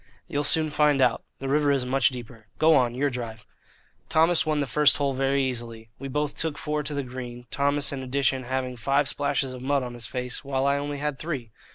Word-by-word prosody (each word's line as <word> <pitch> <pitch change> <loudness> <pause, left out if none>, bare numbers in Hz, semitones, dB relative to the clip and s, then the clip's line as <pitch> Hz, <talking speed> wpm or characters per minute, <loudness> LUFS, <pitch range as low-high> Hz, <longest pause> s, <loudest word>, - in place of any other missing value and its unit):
"You'll 145 -4 -1
soon 155 +1 +3
find 150 -1 +3
out. 125 -3 +2
The 135 - -5
river 145 +1 +3
is 135 -3 +1
much 135 +2 +3
deeper. 120 -3 -10
Go 160 0 +5
on 120 -3 +2
your 140 +2 +1
drive." 115 -3 -6 0.6
Thomas 165 +1 +4
won 155 -1 +1
the 145 - +1
first 150 +3 +5
hole 140 -2 0
very 135 +1 +1
easily. 115 -3 -4
We 135 - -5
both 150 +2 -2
took 160 -2 -1
four 150 0 -2
to 145 0 -3
the 140 - -1
green, 125 -1 -8
Thomas 140 +1 +1
in 135 -2 -4
addition 130 0 0
having 130 0 -3
five 140 +4 +1
splashes 140 -2 -1
of 125 - -8
mud 140 +1 +1
on 125 -1 -6
his 120 -2 -3
face 125 +2 -4
while 135 -1 -1
I 140 0 +3
only 145 0 -4
had 145 -1 -3
three. 135 -9 -4
135 Hz, 220 wpm, -26 LUFS, 125-145 Hz, 0.6 s, Go